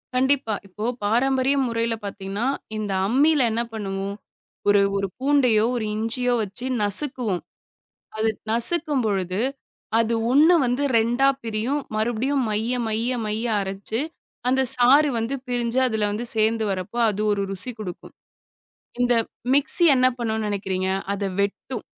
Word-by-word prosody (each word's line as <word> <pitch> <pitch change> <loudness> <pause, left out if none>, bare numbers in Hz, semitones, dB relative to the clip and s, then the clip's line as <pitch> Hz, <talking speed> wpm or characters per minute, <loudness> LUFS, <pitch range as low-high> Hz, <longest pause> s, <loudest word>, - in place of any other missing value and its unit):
கண்டிப்பா. 260 -3 +2
இப்போ 210 +3 -6 0.2
பாரம்பரிய 260 +5 +2
முறையில 230 0 -1
பாத்தீங்கன்னா, 200 +3 -3 0.3
இந்த 210 -2 -3 0.2
அம்மில 285 +6 +3
என்ன 225 +2 0
பண்ணுவோம். 195 -2 -4 0.5
ஒரு 205 0 +5 0.2
ஒரு 195 0 -1
பூண்டையோ, 255 -6 +3
ஒரு 230 -3 -2
இஞ்சியோ 245 +3 -1
வெச்சு 210 +4 -6 0.2
நசுக்குவோம். 210 -2 0 0.8
அது 220 +1 +2 0.2
நசுக்கும்பொழுது, 230 - 0 0.6
அது 230 0 +1 0.2
1 310 +6 +6
வந்து 250 +3 0
2 240 +4 +3 0.2
பிரியும். 230 +6 -1
மறுபடியும் 240 +5 0
மைய, 220 +3 -1 0.2
மைய, 225 +3 -1
மைய 215 +2 -2 0.2
அரச்சு, 195 +4 -4 0.5
அந்தச் 260 0 +3
சாறு 275 +5 +5
வந்து 230 +4 -2
பிரிஞ்சு 245 0 0
அதுல 220 -3 0
வந்து 215 +4 -3
சேர்ந்து 220 +1 +2
வரப்போ, 190 +5 -4
அது 210 0 -3
ஒரு 200 -1 0
ருசி 195 +6 -1
குடுக்கும். 185 -5 -8 0.9
இந்த 245 0 +3 0.4
மிக்ஸி 285 +5 +3
என்ன 255 0 +4
பண்ணுன்னு 220 -2 -1
நெனைக்கிறீங்க. 190 -2 -2 0.2
அத 200 - -4 0.2
வெட்டும். 205 +4 -3
225 Hz, 130 wpm, -23 LUFS, 205-255 Hz, 0.9 s, 1